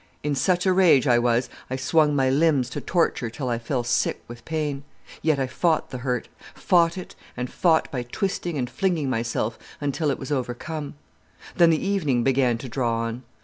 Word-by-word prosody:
In 150 0 0
such 180 +6 +1
a 185 - +4
rage 175 -8 +5
I 120 -3 +4
was 120 +1 +1 0.2
I 130 - -2
swung 150 +2 +2
my 135 -2 +2
limbs 135 -2 +2
to - - -4
torture 165 -9 0
till 130 +2 -4
I 120 -1 -1
fell 120 +1 -2
sick 120 +1 0
with 120 -1 -10
pain. 150 -3 -2 0.4
Yet 155 -2 +2
I 135 - 0
fought 160 +5 0
the 125 - -5
hurt, 125 -1 -2 0.3
fought 170 -1 +3
it 185 - -7 0.2
and 125 0 -2
fought 165 -3 +2
by 125 - -2
twisting 175 - -3
and 125 -2 -1
flinging 160 0 -1
myself, 115 -1 -2 0.2
until 145 +2 -1
it 135 - 0
was 135 - -7
overcome. 145 +3 -3 0.6
Then 170 -2 +6
the 160 +1 +1
evening 155 -12 +1
began 130 -2 +2
to 130 - -8
draw 115 -2 -1
on. 115 +1 -4
135 Hz, 190 wpm, -24 LUFS, 125-160 Hz, 0.6 s, Then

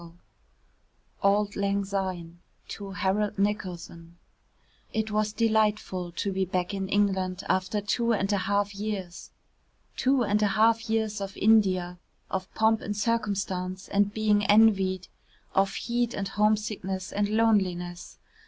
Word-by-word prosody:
XIII 170 -1 -12 1.1
AULD 205 +1 +2
LANG 200 0 0
SYNE 185 -4 -4 0.3
[To 200 -1 -7
HAROLD 200 +2 -1
NICOLSON] 175 -4 -3 0.8
It 220 0 -1
was 215 0 +1
delightful 215 -5 0
to 200 +3 -2
be 190 0 0
back 180 +1 -2
in 195 -1 -3
England 190 -2 0
after 185 +3 0
two 235 +3 0
and 200 -2 +1
a - - +2
half 200 +1 0
years. 200 -3 -5 0.7
Two 260 -1 +2
and 210 -1 +1
a 210 - +4
half 225 +1 +3
years 220 -2 0
of 195 0 -6
India, 185 -5 +3 0.3
of 190 0 -3
pomp 220 0 +3
and 205 0 -4
circumstance 195 -4 -2
and 200 0 +2
being 210 -1 +2
envied, 195 -4 +4 0.5
of 195 0 +2
heat 240 0 -1
and 195 -1 -3
homesickness 210 -3 -1
and 205 0 0
loneliness. 190 -6 0
200 Hz, 135 wpm, -27 LUFS, 190-215 Hz, 1.1 s, a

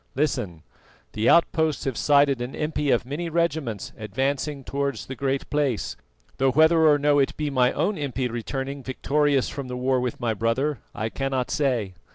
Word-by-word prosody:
Listen: 125 - -1 0.5
the 110 +2 +2
outposts 160 -2 +3
have 135 -3 -1
sighted 140 -2 +3
an 125 +2 -5
impi 150 -1 -1
of 120 -1 +2
many 155 +6 -4
regiments 155 - -1
advancing 135 +6 -2
towards 140 +1 -3
the 130 - -6
Great 135 +1 -2
Place, 145 -6 0 0.4
though 135 0 +3
whether 160 +4 +5
or 150 -1 +6
no 145 0 +3
it 135 - +1
be 150 -1 -2
my 125 -2 +3
own 180 +5 0
impi 130 -3 -2
returning 135 +4 -4
victorious 140 +1 +1
from 140 -2 -6
the 125 0 -5
war 130 +1 +1
with 125 -1 -3
my 115 -2 0
brother, 115 +6 0 0.2
I 110 +1 -2
cannot 135 0 -2
say. 125 -10 0
135 Hz, 175 wpm, -25 LUFS, 125-150 Hz, 0.5 s, or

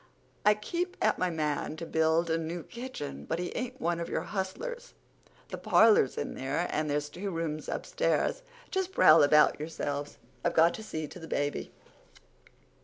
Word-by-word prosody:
I 210 0 +5
keep 345 - -3
at - - +2
my 185 - +1
man 155 -2 -2
to 165 - -5
build 160 +1 +2
a 165 - +2
new 165 +1 -4
kitchen, 240 - -7
but 165 - -2
he 180 0 -4
ain't 255 +1 -4
one 170 0 0
of 170 - -4
your - - -1
hustlers. 475 - -5 0.5
The - - -6
parlor's 215 - +5
in - - -3
there 135 +6 -2
and 155 0 -1
there's 145 0 0
two 185 +7 -5
rooms 165 -3 -3
upstairs. - - 0 0.3
Just 380 0 -1
prowl 155 - +7
about 150 +1 +5
yourselves. 145 -2 -4 0.3
I've - - 0
got 165 +1 +5
to 220 - -7
see 155 -7 -4
to 180 - -10
the 165 - -9
baby. 145 -1 -2
165 Hz, 175 wpm, -30 LUFS, 155-210 Hz, 0.5 s, prowl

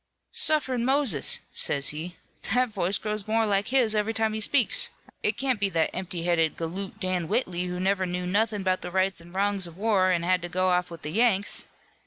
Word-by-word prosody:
'Sufferin' 305 - +1
Moses!' 260 - +1
says 140 -1 +1
he, 165 +4 -5 0.3
'that 250 +4 +1
voice 195 -2 +1
grows 210 -1 -3
more 225 +1 +2
like 200 -1 +1
his 250 -4 +2
every 215 +1 0
time 220 -1 +1
he 220 - -3
speaks. 250 +3 +3 0.3
It 210 - 0
can't 260 -3 0
be 200 -1 +2
that 165 -3 +1
empty 180 -2 -4
headed 165 -2 +1
galoot, 180 +4 -5
Dan 185 -3 -1
Whitley, 180 -4 -1
who 180 0 -4
never 190 0 +1
knew 180 0 -3
nothin' 205 +2 0
'bout 185 -1 0
the 180 - -5
rights 190 0 0
an' 170 +1 -15
wrongs 195 0 0
of 165 - -12
the 190 - -14
war, 200 -4 +3
an' 175 -2 +1
had 180 +1 +2
to 175 - -6
go 185 +1 +1
off 180 0 +1
with 170 -2 -10
the 150 - -4
Yanks!' 210 -1 +2
190 Hz, 215 wpm, -26 LUFS, 180-220 Hz, 0.3 s, speaks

